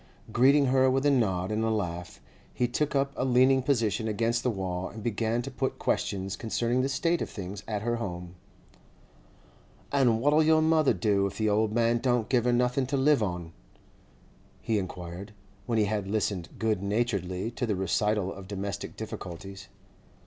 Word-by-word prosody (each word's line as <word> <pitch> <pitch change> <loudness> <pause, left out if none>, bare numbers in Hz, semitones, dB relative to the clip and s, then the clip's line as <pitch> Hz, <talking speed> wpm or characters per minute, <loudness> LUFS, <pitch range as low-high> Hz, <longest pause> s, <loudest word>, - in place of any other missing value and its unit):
Greeting 140 +4 +5
her 130 0 +4
with 135 +2 +1
a 145 - +5
nod 95 -7 +1
and 110 +1 0
a 110 - +1
laugh, 90 -5 -3 0.4
he 125 - +1
took 145 +4 -1
up 140 0 +1
a - - -1
leaning 130 +1 +4
position 115 -5 0
against 115 +2 0
the 125 - 0
wall, 95 -4 -3
and 110 0 -9
began 115 +1 -1
to 135 - -6
put 130 +1 -2
questions 95 0 -1
concerning 120 +2 0
the 135 - 0
state 165 +5 0
of - - -3
things 95 0 -7
at 105 -2 -3
her 120 +1 0
home. 90 -6 -5 1.6
'And 125 -5 +3
what'll 145 +5 +4
your 155 0 +4
mother 160 -2 +3
do 100 -3 +2
if 100 0 -8
the 110 -1 +1
old 105 +1 +2
man 115 +1 +2
don't 120 -3 0
give 125 -2 +2
her 125 - +3
nothing 125 +2 +1
to 140 +1 -1
live 140 -1 +4
on?' 90 -5 -3 1.1
he 110 -2 0
inquired, 90 +2 -7 0.3
when 115 -2 0
he 105 - +3
had 105 -1 -2
listened 100 -4 -1
good 110 -4 0
naturedly 100 -2 -1
to 120 +1 -3
the 105 - 0
recital 95 +1 0
of 95 -1 -10
domestic 100 0 -5
difficulties. 95 -2 -7
110 Hz, 180 wpm, -28 LUFS, 100-125 Hz, 1.6 s, Greeting